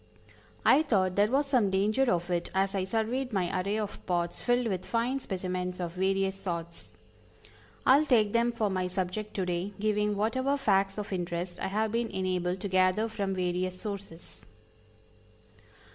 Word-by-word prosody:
I 295 - +7
thought 190 - +1
there 205 +1 +4
was 275 +4 +2
some 250 -7 +2
danger 215 +7 +2
of 175 0 -1
it 175 -1 -1
as 195 +1 +1
I 190 -2 0
surveyed 230 +6 -1
my 185 -2 0
array 200 +3 -1
of 210 -2 -4
pots 175 -1 -1
filled 245 0 +2
with 190 -5 -2
fine 240 +6 0
specimens 180 -4 -3
of 175 -2 -3
various 195 +1 0
sorts. 170 -2 -6 0.9
I 265 +2 +7
will 305 - 0
take 215 -6 +3
them 235 +1 +3
for 220 -4 -1
my 185 -1 0
subject 185 +3 -3
to 190 - 0
day, 180 +3 -2
giving 210 0 +1
whatever 260 +7 +1
facts 195 -6 +2
of 205 -1 -4
interest 175 0 -3
I - - -1
have 215 +2 0
been 235 +1 0
enabled 185 -1 -1
to 205 - -2
gather 185 +3 +3
from 200 -3 -2
various 180 0 -1
sources. 200 -5 -8
195 Hz, 170 wpm, -29 LUFS, 185-220 Hz, 0.9 s, I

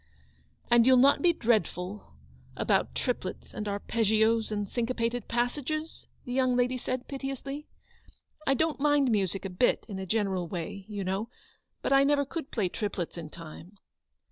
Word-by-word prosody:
"And 240 0 +6
you'll 260 -1 +7
not 275 +3 +5
be 355 - +5
dreadful, 205 - -1 0.4
about - - +1
triplets - - -3
and 210 - -4
arpeggios, 220 +2 +1
and 205 -1 -1
cinquepated 235 0 -1
passages? 290 +6 -2 0.2
the 245 - -4
young 255 -1 +2
lady 250 +1 +2
said, 255 0 -3
piteously. 275 +2 -5 0.4
" 310 - -25
I 270 - +4
don't 315 +1 0
mind 290 -3 +3
music 195 -2 0
a - - -2
bit, 180 +7 +2
in 195 -4 -5
a 190 - -5
general 195 -4 0
way, 180 +3 -5
you 205 -2 -4
know; 195 +5 -2 0.5
but - - +2
I 275 0 +6
never 285 0 +3
could 310 +1 -5
play 210 -6 0
triplets 190 -3 -3
in 165 -3 -7
time." 170 +4 -11
230 Hz, 160 wpm, -29 LUFS, 200-270 Hz, 0.5 s, you'll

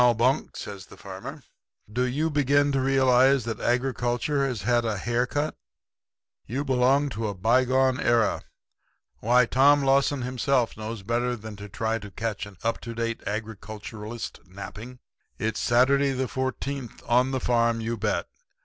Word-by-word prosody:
"'Now, 120 -1 +6
Bunk,' 125 +5 +1
says 100 -2 -7
the - - -14
farmer, - - -8 0.5
'do 125 +2 +1
you 150 +6 0
begin 145 0 +3
to 135 -1 +1
realize 130 -1 +4
that 115 -1 -3
agriculture 125 +2 0
has 120 -7 -4
had 120 +1 +2
a 110 -3 -1
hair 120 +5 0
cut? 145 +4 -2 0.9
You 135 +6 -2
belong 135 +2 +3
in 115 - -3
a 105 -2 -2
bygone 130 +5 +2
era. 115 -2 +2 0.8
Why, 120 +2 +4
Tom 140 +4 +4
Lawson 135 0 +2
himself 125 0 0
knows 110 -1 -6
better 120 +3 0
than 110 -2 -9
to 100 +1 -9
try 110 +2 -1
to 105 -1 -9
catch 110 0 -4
an 100 -3 -14
up 115 0 -1
to 115 -1 -7
date 115 0 -2
agriculturalist 110 +1 -6
napping. 105 +6 -9 0.4
It's 110 -3 -2
Saturday, 135 +3 +3
the 130 0 -1
Fourteenth, 130 0 -4
on 125 +2 +3
the 135 -1 -1
farm, 115 -2 +2
you 115 +1 -2
bet. 105 -1 -1
120 Hz, 160 wpm, -26 LUFS, 110-130 Hz, 0.9 s, Now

